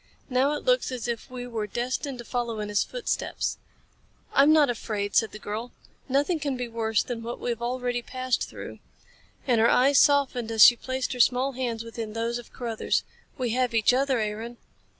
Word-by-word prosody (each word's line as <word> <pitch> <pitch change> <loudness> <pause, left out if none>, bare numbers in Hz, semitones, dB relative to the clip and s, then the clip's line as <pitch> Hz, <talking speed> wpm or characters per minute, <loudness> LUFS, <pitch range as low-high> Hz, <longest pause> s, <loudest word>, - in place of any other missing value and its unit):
Now 265 +3 +3
it 295 - -5
looks - - +2
as 245 -2 -4
if 235 +2 -4
we 250 -1 -6
were 225 -3 -4
destined 255 +5 -3
to 240 - -9
follow 235 -3 -2
in 210 0 -4
his 205 0 +2
footsteps." - - -3 0.7
"I'm 280 +3 +6
not 310 -2 +6
afraid," 210 -4 -3
said 225 - +3
the - - -8
girl. 215 +3 -6 0.4
"Nothing 290 +6 +1
can 285 -3 -2
be 250 -1 -3
worse 225 -2 0
than 240 -2 -5
what 235 +1 -6
we 245 - -2
have 235 - -5
already 245 0 -1
passed 255 +1 -2
through." - - -9 0.7
And 240 -4 +3
her 230 - +5
eyes 275 +3 +5
softened 265 -5 +3
as 220 -1 +8
she 240 - +8
placed 260 +2 -3
her 250 - -7
small 250 +3 +3
hands 240 -3 -3
within 230 -2 -6
those 230 +1 -2
of 240 - -13
Carruthers. 230 -3 -1 0.3
"We 250 -4 -1
have 250 0 0
each 225 +2 +4
other, 265 0 +2
Aaron." 220 +2 -4
245 Hz, 195 wpm, -26 LUFS, 230-260 Hz, 0.7 s, as